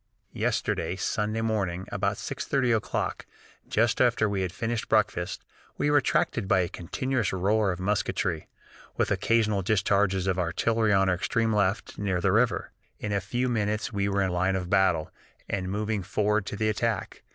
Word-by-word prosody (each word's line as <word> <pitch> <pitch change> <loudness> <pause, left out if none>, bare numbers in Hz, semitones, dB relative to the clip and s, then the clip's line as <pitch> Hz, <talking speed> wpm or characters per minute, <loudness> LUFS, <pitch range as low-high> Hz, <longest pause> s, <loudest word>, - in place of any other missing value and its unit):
"Yesterday - - -1
(Sunday) 110 +2 -1
morning, 95 -5 -1
about 100 +1 0
6.30 125 -4 0
o'clock, 110 - -2 0.4
just 115 +1 +2
after 120 -3 +3
we 100 -2 -1
had 90 -2 -2
finished 115 +4 -3
breakfast, 95 -4 0 0.3
we 145 - +1
were 145 - +5
attracted 115 -5 0
by 95 - +4
a 90 - 0
continuous 120 +6 -2
roar 100 +2 +2
of 90 - -5
musketry, 95 -5 -1 0.5
with - - +1
occasional 110 -3 +2
discharges 95 -1 +2
of 95 -1 0
artillery 110 +6 +1
on 95 -1 +4
our 95 - +3
extreme 110 +5 0
left, 100 0 0
near 95 -3 0
the 95 +2 +2
river. 115 +4 +1 0.3
In 105 - -4
a 100 -1 +1
few 120 +6 -1
minutes 105 -2 -1
we 100 0 0
were 100 0 +1
in 95 - 0
line 95 +2 +1
of 90 -1 -3
battle, 95 -5 +2 0.4
and 95 -2 -2
moving 105 +1 -1
forward 105 +2 0
to - - -4
the 110 +1 0
attack. 110 -2 -2
100 Hz, 170 wpm, -27 LUFS, 95-110 Hz, 0.5 s, were